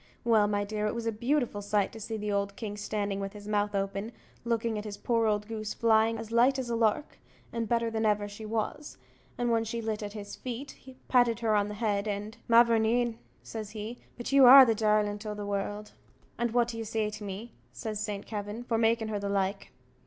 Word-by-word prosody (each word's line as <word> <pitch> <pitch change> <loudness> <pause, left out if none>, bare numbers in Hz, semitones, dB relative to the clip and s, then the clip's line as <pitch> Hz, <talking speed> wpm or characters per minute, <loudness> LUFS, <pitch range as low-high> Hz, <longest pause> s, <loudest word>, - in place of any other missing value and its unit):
Well, 220 -3 +4
my 205 0 0
dear, 210 +1 -2
it 210 - -2
was 235 -1 -4
a 230 - +1
beautiful 240 -1 0
sight 205 -1 0
to 225 - -10
see 220 +1 -4
the 200 -1 -1
king 210 -2 -5
standing 205 -1 -2
with 195 0 -4
his 205 -1 -10
mouth 205 -1 0
open, 195 +3 -2 0.3
looking 230 -2 -1
at - - -6
his 205 -2 -6
poor 230 -2 +1
old 210 -1 0
goose 215 -1 -4
flying 225 0 +3
as 225 0 -7
light 245 +4 +4
as 250 -2 -3
a - - +1
lark, 230 +5 0 0.3
and 230 -2 -2
better 230 -1 +1
than 220 0 -1
ever 210 -1 +2
she 205 +2 -9
was; 220 +7 -3 0.4
and 240 -1 0
when 225 -1 +2
she 225 +1 -4
lit 220 -1 -3
at 205 -1 -5
his 205 -2 -7
feet, 260 +2 -7 0.2
patted 240 -2 +3
her 225 -2 +2
on 205 -1 +2
the 210 - -6
head, 205 -1 -1
and 210 +3 -4
"Ma 235 0 +8
vourneen," 230 0 +1 0.2
says 215 -2 -6
he 220 +3 -7 0.2
"but 240 - -5
you 275 -1 +6
are 265 +1 +11
the 230 - +3
darlint 210 -1 +1
o' 210 -1 -4
the 205 0 -5
world." 205 +1 -3 0.4
"And 240 0 0
what 240 +1 +2
do 230 -1 -5
you - - -3
say 220 -1 -1
to 210 0 -8
me," 205 +4 -7 0.2
says 215 -2 -5
Saint 210 -2 -4
Kavin, 210 +2 -5
"for 230 -2 0
making 225 -1 +2
her 210 -1 -2
the 200 0 -3
like?" 195 0 -1
220 Hz, 225 wpm, -29 LUFS, 205-230 Hz, 0.4 s, are